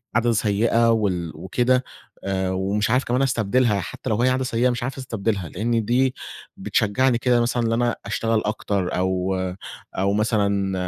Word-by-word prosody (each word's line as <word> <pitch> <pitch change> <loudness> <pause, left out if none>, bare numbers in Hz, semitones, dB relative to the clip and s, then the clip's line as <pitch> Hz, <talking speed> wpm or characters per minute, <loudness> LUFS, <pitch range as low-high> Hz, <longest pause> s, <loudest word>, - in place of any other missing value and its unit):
عادة 120 +1 +3
سيئة 115 +2 +2
وال 95 -7 0
وكده؟ 125 +10 +1 0.4
آآ، 95 -1 -1
ومش 100 +3 0
عارف 125 +4 +2
كمان 125 +2 0
أستبدلها 120 -3 +2
حتّى 95 +7 -6
لو 110 +1 +1
هي 125 - +4
عادة 130 +1 0
سيئة 125 0 +1
مش 120 0 -2
عارف 130 +2 -4
أستبدلها 110 -8 -2
لإن 115 +3 -1
دي 125 +3 +2 0.4
بتشجعني 120 +4 +1
كده 120 0 +2
مثلًا 120 0 0
إن - - 0
أنا 120 +1 +1
أشتغل 115 -1 0
أكتر 100 -3 -1
أو 95 +1 0 0.6
أو 100 +1 +1
مثلًا 100 -2 +1
115 Hz, 160 wpm, -23 LUFS, 100-120 Hz, 0.6 s, هي